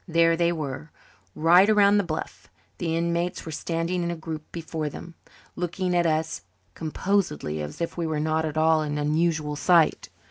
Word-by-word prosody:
There 165 -1 +3
they 170 0 +2
were, 150 -2 -5 0.5
right 175 +6 +5
around 205 -1 +5
the - - +1
bluff. 160 -3 -6 0.3
The 165 -2 -1
inmates 170 +1 -1
were 160 - -6
standing 165 +3 -2
in 170 - -1
a 170 - -2
group 160 -1 -7
before 160 -2 -4
them, 170 +4 -10 0.4
looking 180 +1 -2
at 175 -1 +3
us 155 0 -1
as - - -27 0.3
composedly 160 - -1
as 75 0 -7
if 170 - -3
we 170 -1 -1
were 155 -1 -1
not 155 +1 0
at 155 -1 -3
all 160 0 +4
an 150 -1 -2
unusual 155 0 0
sight. 170 +1 +3
165 Hz, 180 wpm, -25 LUFS, 155-175 Hz, 0.5 s, right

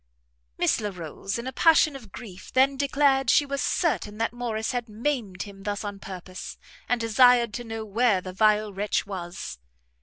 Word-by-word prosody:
Miss - - +2
Larolles, 195 +1 -4
in 235 - -5
a 260 - -4
passion 315 -3 +5
of 230 -7 -11
grief, 190 -5 -10
then 270 +2 +4
declared 275 -2 +2
she 290 - +5
was 280 0 -3
certain 215 - 0
that 230 +1 -1
Morrice 230 -2 -2
had 245 -2 -3
maimed 220 -4 -2
him 200 -1 -11
thus 205 +1 -3
on 205 -1 -5
purpose, 185 -1 -8 0.3
and 245 - +2
desired 235 0 +5
to 240 - -4
know 225 -1 -5
where 215 -1 +2
the 185 0 -8
vile 215 +1 +3
wretch 205 +2 -1
was? 175 - -6
220 Hz, 175 wpm, -26 LUFS, 195-250 Hz, 0.3 s, passion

